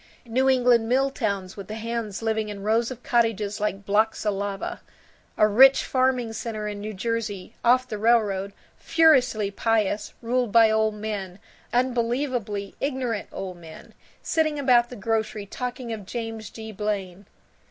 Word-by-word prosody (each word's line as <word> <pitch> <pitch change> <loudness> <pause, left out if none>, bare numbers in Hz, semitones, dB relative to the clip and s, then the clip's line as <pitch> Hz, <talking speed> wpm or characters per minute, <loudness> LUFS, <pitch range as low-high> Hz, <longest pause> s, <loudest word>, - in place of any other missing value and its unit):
New 255 +3 +2
England 245 -3 +3
mill 270 +2 +2
towns 200 -7 -3
with 200 -2 -8
the 215 - -6
hands 225 -2 -4
living 220 -1 0
in 200 -1 -7
rows 225 +2 +1
of 250 -2 -9
cottages 225 -4 +1
like 200 -1 -2
blocks 215 +3 +1
of 210 - +2
lava. 195 0 -4 0.6
A 215 - +5
rich 265 +6 +6
farming 255 -3 +1
center 215 -1 -4
in 205 -1 -5
New 210 +1 -6
Jersey, 215 -1 -3
off 255 +2 +4
the 215 -3 -5
railroad, 205 -4 +2 0.3
furiously 260 -11 +3
pious, 215 -1 0
ruled 245 -1 0
by 225 -1 +6
old 220 0 +1
men, 205 -4 -5 0.3
unbelievably 240 -4 -1
ignorant 255 -6 -2
old 185 -2 -6
men, 160 -2 -13 0.3
sitting 310 -2 +1
about 245 -4 +4
the 250 - -8
grocery 220 -1 -2
talking 245 +2 -5
of 210 -4 -8
James 225 -1 -5
G. 220 -1 -8
Blaine. 200 -2 -4
220 Hz, 155 wpm, -25 LUFS, 205-245 Hz, 0.6 s, rich